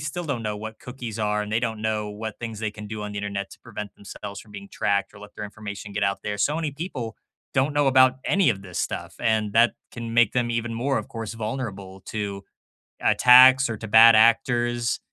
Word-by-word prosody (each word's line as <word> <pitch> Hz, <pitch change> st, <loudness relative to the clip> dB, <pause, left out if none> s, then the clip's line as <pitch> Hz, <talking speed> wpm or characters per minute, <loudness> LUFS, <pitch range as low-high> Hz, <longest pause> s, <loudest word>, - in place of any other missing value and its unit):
still 155 Hz, +4 st, -4 dB
don't 135 Hz, -6 st, -3 dB
know 105 Hz, -1 st, -3 dB
what 110 Hz, +1 st, -8 dB
cookies 120 Hz, -4 st, -7 dB
are, 105 Hz, -1 st, 0 dB
and 105 Hz, 0 st, -6 dB
they 115 Hz, -, +2 dB
don't 110 Hz, -3 st, -3 dB
know 110 Hz, -1 st, -1 dB
what 105 Hz, +1 st, -7 dB
things 115 Hz, -2 st, -6 dB
they 110 Hz, -1 st, -2 dB
can 105 Hz, 0 st, -10 dB
do 105 Hz, 0 st, -6 dB
on 105 Hz, 0 st, -5 dB
the 100 Hz, -, -4 dB
Internet 100 Hz, -1 st, -4 dB
to -, -, -13 dB
prevent 105 Hz, -4 st, -8 dB
themselves 100 Hz, 0 st, -9 dB
from 105 Hz, -, -17 dB
being 100 Hz, -1 st, -9 dB
tracked 100 Hz, +1 st, 0 dB
or 100 Hz, -, -14 dB
let 105 Hz, 0 st, -13 dB
their 105 Hz, -, -6 dB
information 100 Hz, -1 st, -8 dB
get 100 Hz, 0 st, -2 dB
out 100 Hz, 0 st, -1 dB
there, 105 Hz, 0 st, -4 dB
so 145 Hz, +8 st, +1 dB
many 160 Hz, -2 st, -2 dB
people 140 Hz, -, -6 dB, 0.4 s
don't 135 Hz, +3 st, +2 dB
know 145 Hz, -1 st, +2 dB
about 130 Hz, -1 st, +5 dB
any 195 Hz, -5 st, +3 dB
of 95 Hz, -3 st, -4 dB
this 90 Hz, -3 st, -7 dB
stuff, -, -, -4 dB
and 110 Hz, -3 st, +1 dB
that 115 Hz, +2 st, +5 dB, 0.2 s
can 115 Hz, -1 st, -6 dB
make 120 Hz, -2 st, +4 dB
them 120 Hz, -1 st, 0 dB
even 115 Hz, 0 st, -2 dB
more, 135 Hz, +4 st, 0 dB
of 110 Hz, -, -7 dB
course, 115 Hz, -1 st, -6 dB
vulnerable 105 Hz, -5 st, -5 dB
to 100 Hz, -2 st, -4 dB, 0.6 s
attacks 130 Hz, +1 st, +7 dB
or 110 Hz, -, -3 dB
to 110 Hz, -, -7 dB
bad 115 Hz, +2 st, +8 dB
actors. 120 Hz, +1 st, +2 dB
110 Hz, 225 wpm, -24 LUFS, 105-120 Hz, 0.6 s, bad